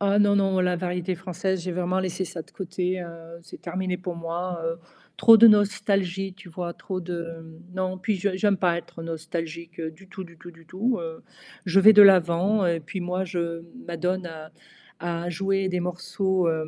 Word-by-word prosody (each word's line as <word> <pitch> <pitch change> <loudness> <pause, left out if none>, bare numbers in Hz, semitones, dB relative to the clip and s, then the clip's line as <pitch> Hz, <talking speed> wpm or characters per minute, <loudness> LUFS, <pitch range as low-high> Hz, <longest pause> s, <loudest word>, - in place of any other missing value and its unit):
Ah 200 +1 +3
non, 205 0 +4
non, 195 -1 +2
la 180 -1 +2
variété 180 0 -2
française, 185 0 -3
j'ai 185 - -3
vraiment 180 +1 0
laissé 185 0 -2
ça 165 -2 -6
de - - -24
côté, 185 0 -3
heu, 170 -1 -10
c'est - - -12
terminé 180 +1 -3
pour 180 -2 -5
moi. 170 +1 -4
Heu, 165 0 -2 0.4
trop 225 -1 +8
de 230 +1 +9
nostalgie, 195 -2 +2
tu 190 -1 -14
vois? 170 0 -5
Trop 185 +1 -5
de 165 -2 -7 0.2
non, 185 0 -2
puis 210 +3 -1
je 190 0 -1
j'aime 200 -1 +2
pas 175 -2 +2
être 170 0 -9
nostalgique 165 0 -6
du 160 +4 -7
tout, 190 0 -8
du 170 -1 -15
tout, 175 +1 -11
du 165 -1 -20
tout. 225 +8 -1
Heu, 165 -1 -7 0.4
je 185 +1 +4
vais 215 +3 +9
de 210 - +10
l'avant 190 +2 +5
et 170 -1 +1
puis 165 +5 -6
moi, 180 +2 -1
je 170 -2 -3 0.2
m'adonne 180 +2 -2
à 160 -1 -10 0.5
à 170 0 -3
jouer 195 +2 0
des 180 -1 -1
morceaux, 180 +1 -1
hem 160 -1 -1
180 Hz, 195 wpm, -25 LUFS, 170-190 Hz, 0.5 s, de